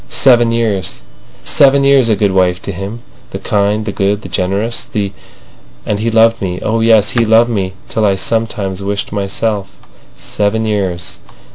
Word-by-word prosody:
Seven 120 Hz, -3 st, +4 dB
years—seven 115 Hz, -, 0 dB
years 140 Hz, -3 st, +4 dB
a 110 Hz, -, +3 dB
good 100 Hz, -2 st, +1 dB
wife 90 Hz, -1 st, +1 dB
to -, -, -4 dB
him, 100 Hz, +6 st, -7 dB, 0.3 s
the -, -, -6 dB
kind, 105 Hz, +1 st, 0 dB
the 105 Hz, -, -2 dB
good, 100 Hz, +2 st, -1 dB
the 95 Hz, -, -8 dB
generous, 100 Hz, +6 st, -1 dB
the—And 100 Hz, 0 st, -7 dB
he 115 Hz, +2 st, 0 dB
loved 115 Hz, 0 st, +3 dB
me. 90 Hz, -2 st, -3 dB
Oh 115 Hz, +1 st, 0 dB
yes. 110 Hz, -2 st, +4 dB
He 120 Hz, -, +2 dB
loved 115 Hz, +2 st, +4 dB
me 95 Hz, -4 st, -2 dB
till 110 Hz, -, -2 dB
I 100 Hz, -2 st, +3 dB
sometimes 100 Hz, -2 st, -2 dB
wished 100 Hz, +1 st, -3 dB
myself—Seven 105 Hz, +1 st, -3 dB
years. 95 Hz, -5 st, -3 dB
105 Hz, 150 wpm, -14 LUFS, 95-115 Hz, 0.3 s, Seven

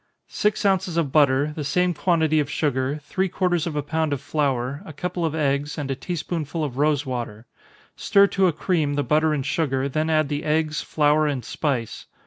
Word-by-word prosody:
_ -, -, -45 dB, 0.2 s
Six 210 Hz, 0 st, -1 dB
ounces 185 Hz, -3 st, +1 dB
of 155 Hz, -5 st, 0 dB
butter, 145 Hz, 0 st, +3 dB
the 150 Hz, -, -4 dB
same 180 Hz, +5 st, +1 dB
quantity 160 Hz, -2 st, +2 dB
of 145 Hz, -2 st, -1 dB
sugar, 140 Hz, 0 st, -1 dB
three 190 Hz, +6 st, -1 dB
quarters 175 Hz, -2 st, 0 dB
of 160 Hz, -, -4 dB
a 145 Hz, -, -1 dB
pound 160 Hz, 0 st, -1 dB
of 140 Hz, -, -2 dB
flour, 140 Hz, -1 st, -1 dB
a 160 Hz, -, -10 dB
couple 180 Hz, +3 st, -3 dB
of 160 Hz, -1 st, -1 dB
eggs, 145 Hz, 0 st, -1 dB
and 140 Hz, -3 st, -3 dB
a -, -, -1 dB
tea 175 Hz, +7 st, -5 dB
spoonful 160 Hz, -1 st, -3 dB
of 135 Hz, -3 st, -4 dB
rosewater. 130 Hz, -7 st, -1 dB, 0.5 s
Stir 200 Hz, 0 st, +4 dB
to 195 Hz, -1 st, +2 dB
a -, -, +3 dB
cream 155 Hz, -3 st, 0 dB
the 145 Hz, -, 0 dB
butter 155 Hz, +2 st, +2 dB
and 140 Hz, -3 st, -1 dB
sugar, 135 Hz, -3 st, 0 dB
then 155 Hz, +3 st, -1 dB
add 155 Hz, -2 st, +2 dB
the 145 Hz, +1 st, -3 dB
eggs, 155 Hz, 0 st, 0 dB
flour, 150 Hz, 0 st, +2 dB
and 135 Hz, -6 st, -2 dB
spice. 130 Hz, -7 st, -3 dB
150 Hz, 205 wpm, -23 LUFS, 140-165 Hz, 0.5 s, Stir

